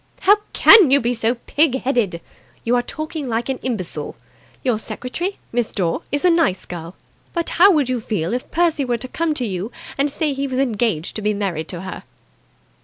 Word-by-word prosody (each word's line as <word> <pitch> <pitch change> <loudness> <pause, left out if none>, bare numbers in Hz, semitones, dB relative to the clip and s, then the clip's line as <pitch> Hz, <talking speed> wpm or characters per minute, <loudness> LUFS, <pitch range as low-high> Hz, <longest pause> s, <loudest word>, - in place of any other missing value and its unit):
"How 410 +2 +6
can 410 - +8
you 280 +2 +6
be 240 0 0
so 230 +1 +1
pig 270 +2 +1
headed! 230 -10 0 0.4
You 240 +2 +2
are 245 - +3
talking 310 +2 -5
like 230 +2 -1
an 265 - -2
imbecile. 220 -9 -4 0.5
Your 245 -5 +1
secretary, 345 - -4
Miss 240 -1 -1
Dore, 175 -4 -1
is 285 +4 0
a 360 - +6
nice 325 - +1
girl. 170 0 -8 0.4
But 340 -2 -1
how 395 - +9
would 300 -8 +3
you 255 -1 -1
feel 205 -4 -2
if 250 - -3
Percy 330 -3 +1
were 245 -2 0
to 250 +3 -5
come 320 +3 -1
to 255 - -1
you 195 +2 -4 0.3
and 285 +1 +2
say 300 +1 0
that 270 - -5
he 275 0 -1
was 260 -1 -3
engaged 225 - 0
to - - -4
be 210 0 0
married 175 -6 -2
to 175 -2 -5
her?" 190 0 -7
245 Hz, 205 wpm, -20 LUFS, 210-290 Hz, 0.5 s, how